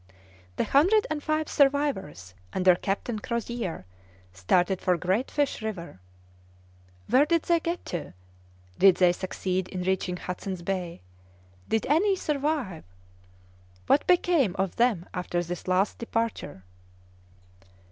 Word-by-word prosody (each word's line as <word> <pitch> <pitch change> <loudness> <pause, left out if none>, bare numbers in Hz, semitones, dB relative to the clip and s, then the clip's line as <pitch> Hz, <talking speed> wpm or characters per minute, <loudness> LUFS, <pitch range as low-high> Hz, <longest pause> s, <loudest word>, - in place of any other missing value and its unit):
The - - 0
hundred 380 +10 +4
and 300 -1 -2
five 310 0 -1
survivors, 275 - 0 0.2
under 185 -1 +5
Captain 200 +5 -3
Crozier, 235 - -4 0.5
started 175 - +1
for 180 -1 +2
Great 190 +8 0
Fish 285 -4 -1
River. 185 - -6 1.1
Where 260 +6 +4
did 335 -1 +2
they 340 -1 +2
get 340 +2 -4
to? 165 - -5 0.6
Did 195 -2 +7
they 180 -1 +5
succeed 185 0 -3
in 180 -1 -5
reaching 185 -1 -1
Hudson's 180 0 -5
Bay? 180 -2 -3 0.7
Did 220 - +1
any 385 +8 +3
survive? 290 - -2 1.0
What 290 - +3
became 340 - +3
of 190 -1 -2
them 230 -8 +2
after 175 -1 -2
this 175 +1 -6
last 185 +2 +1
departure?" 225 - -3
195 Hz, 120 wpm, -27 LUFS, 180-285 Hz, 1.1 s, Did